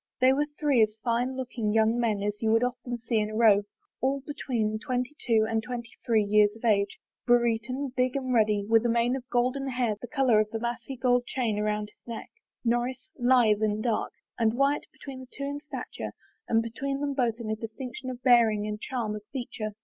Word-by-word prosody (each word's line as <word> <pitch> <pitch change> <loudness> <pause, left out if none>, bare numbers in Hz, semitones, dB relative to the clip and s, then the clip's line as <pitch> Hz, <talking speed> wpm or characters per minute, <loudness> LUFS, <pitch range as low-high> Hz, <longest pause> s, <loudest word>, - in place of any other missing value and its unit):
They 255 +1 +5
were 295 +2 +1
three 285 -6 +3
as 215 0 +2
fine 245 +2 0
looking 240 -4 -2
young 225 +1 +3
men 215 -4 0
as 210 0 -2
you 220 -1 +2
would 225 +2 +4
often 245 0 -3
see 230 -1 0
in 210 0 -1
a 215 - -6
row, 215 -3 +6 0.4
all 270 +2 +1
between 230 -7 -2
twenty 255 +3 -2
two 220 -2 +4
and 225 0 0
twenty 240 0 -6
three 225 -3 +3
years 210 0 +4
of 225 - -8
age; 200 -3 +2 0.3
Brereton 240 +3 +1
big 255 0 +1
and 260 -2 -1
ruddy, 210 -3 +3
with 225 0 +4
a 240 - +1
mane 235 +2 +2
of 260 0 -7
golden 255 +3 0
hair 245 -4 0
the 245 - -6
color 260 -6 +3
of 215 0 +1
the 225 - -3
massy 240 +3 -4
gold 245 -1 +2
chain 230 -5 -1
about 210 0 -1
his - - -35
neck, 230 -2 -7 0.3
Norris 240 +2 -1
lithe 240 -4 +4
and 215 0 0
dark, 230 -3 0 0.3
and 225 0 +2
Wyatt 275 +3 +1
between 270 -2 -9
the 260 - -10
two 280 - -6
in 285 +1 -3
stature 300 +1 -6 0.3
and 225 0 +3
beyond 275 +5 -3
them 285 -1 -1
both 245 -4 +1
in 220 -2 -4
a - - 0
distinction 240 +3 -6
of 250 -1 -7
bearing 230 -4 +5
and 210 0 -4
charm 230 -5 -2
of 210 - -6
feature. 230 -5 -5
235 Hz, 210 wpm, -28 LUFS, 220-255 Hz, 0.4 s, row